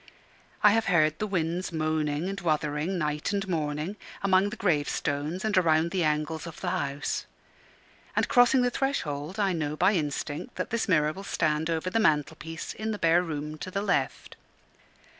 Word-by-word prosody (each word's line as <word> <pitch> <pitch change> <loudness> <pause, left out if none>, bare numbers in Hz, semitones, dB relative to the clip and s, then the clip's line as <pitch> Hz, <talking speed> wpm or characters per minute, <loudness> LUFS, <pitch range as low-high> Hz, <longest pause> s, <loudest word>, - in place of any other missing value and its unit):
I 210 - +8
have 225 +1 +2
heard 155 -4 +3
the 215 - -1
winds 180 -1 -1
moaning 155 0 -1
and 195 +1 -4
wuthering 155 +2 0
night 150 +1 -1
and 200 -1 -1
morning, 155 +2 -2 0.3
among 190 0 +4
the 225 - -6
gravestones, 150 -1 -1
and 215 -1 +1
around 165 -2 +3
the 185 -1 +1
angles 155 +1 -1
of 165 - -9
the - - -2
house; 140 +1 -2 0.9
and - - +2
crossing 245 +1 +5
the 245 - +2
threshold, 180 - -2
I 195 -2 +2
know 150 -3 -2
by 185 +6 +3
instinct 150 - -3
that - - -4
this 230 -2 -1
mirror 155 -3 +3
will 195 - -8
stand 155 -3 0
over 165 +2 -1
the 225 - +2
mantelpiece 160 -2 0
in 220 +1 -4
the 215 - -2
bare 170 -1 +4
room 155 -2 -5
to 185 - -5
the 195 +2 -2
left. - - -1
165 Hz, 175 wpm, -28 LUFS, 150-195 Hz, 0.9 s, I